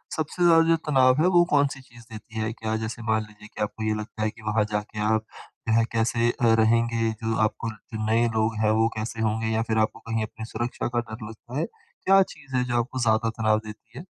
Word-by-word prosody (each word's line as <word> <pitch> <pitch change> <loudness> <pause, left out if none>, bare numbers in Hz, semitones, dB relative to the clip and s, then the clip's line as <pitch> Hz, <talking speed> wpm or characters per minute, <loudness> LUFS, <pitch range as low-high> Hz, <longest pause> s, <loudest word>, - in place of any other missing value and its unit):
सबसे 160 +3 -2
ज़्यादा 165 -1 +6
जो 165 - +6
तनाव 130 0 +4
है, 175 - +4
वो 175 -2 +5
कौन-सी 140 -1 +2
चीज़ 120 -2 -16
देती 110 +1 -8
है? 110 +1 -1
क्या 110 -1 -3
जैसे 110 +1 -5
मान 110 0 +3
लीजिए 105 0 -15
कि - - -5
आपको 110 +1 -4
ये 110 0 +1
लगता 110 0 -5
है 110 - +1
कि 110 - -13
वहाँ 105 0 +2
जा 105 - +1
के 105 - -5
आप 110 0 0 0.4
वह 115 +1 +4
कैसे 115 +1 +1
अ, 115 -3 +2
रहेंगे? 115 0 +2
जो 110 +1 -3
आपको 110 +1 -1
जो 110 0 -7
नए 115 +2 +3
लोग 110 +1 +1
हैं, 105 - +4
वो 115 - +4
कैसे 110 +1 -4
होंगे? 110 0 0
या 110 - +2
फ़िर 110 - 0
आपको 110 +1 +1
कहीं 115 -1 0
अपनी 110 +1 -7
सुरक्षा 120 +2 -3
का - - +3
डर 110 -1 -7
लगता 120 +3 -9
है, - - +1 0.4
क्या 195 0 +6
चीज़ 135 -3 -9
है 125 - +2
जो 120 -1 -1
आपको 125 +2 -3
ज़्यादा 115 -1 +2
तनाव 110 -1 +2
देती 110 +2 -11
है? 170 - -10
115 Hz, 235 wpm, -25 LUFS, 110-125 Hz, 0.4 s, ज़्यादा